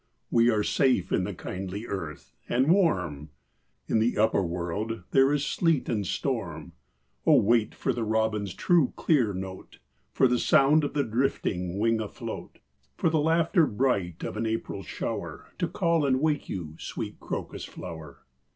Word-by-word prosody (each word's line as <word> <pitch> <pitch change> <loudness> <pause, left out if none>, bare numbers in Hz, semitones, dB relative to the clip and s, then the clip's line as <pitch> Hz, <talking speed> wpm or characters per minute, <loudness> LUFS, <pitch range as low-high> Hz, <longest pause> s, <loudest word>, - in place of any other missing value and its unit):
We 115 +1 +5
are 110 -3 +2
safe 130 -8 +2
in - - +1
the - - -4
kindly 95 +3 -5
earth, 75 - -6 0.2
and 130 +6 +3
warm— 90 - +1 0.6
In 110 - +2
the 115 +3 +1
upper 110 -1 +3
world 90 +5 -3
there 135 +1 +5
is 145 -1 +1
sleet 165 -5 +1
and 105 -5 -1
storm. 90 - -3 0.5
Oh, - - +6
wait 115 +1 +2
for 135 - -1
the 120 -1 -2
robin's 110 -3 0
true, 170 -7 +3
clear 130 -10 +2
note, 95 0 -7 0.3
For 130 - +4
the 125 -1 +1
sound 150 +3 +4
of 145 +1 -3
a 140 - +3
drifting 105 -7 -1
wing 115 +1 +2
afloat; 105 - -7 0.4
For 165 - +1
the 160 - +2
laughter 165 +1 +3
bright 100 -8 -1
of - - -4
an 115 +1 -1
April 110 +1 -3
shower - - -5
To 175 - +1
call 170 -2 +1
and 130 -2 +2
wake 150 0 0
you, 80 -4 -5
sweet - - -6
Crocus - - -5
flower." 80 -4 -9
115 Hz, 160 wpm, -27 LUFS, 95-140 Hz, 0.6 s, Oh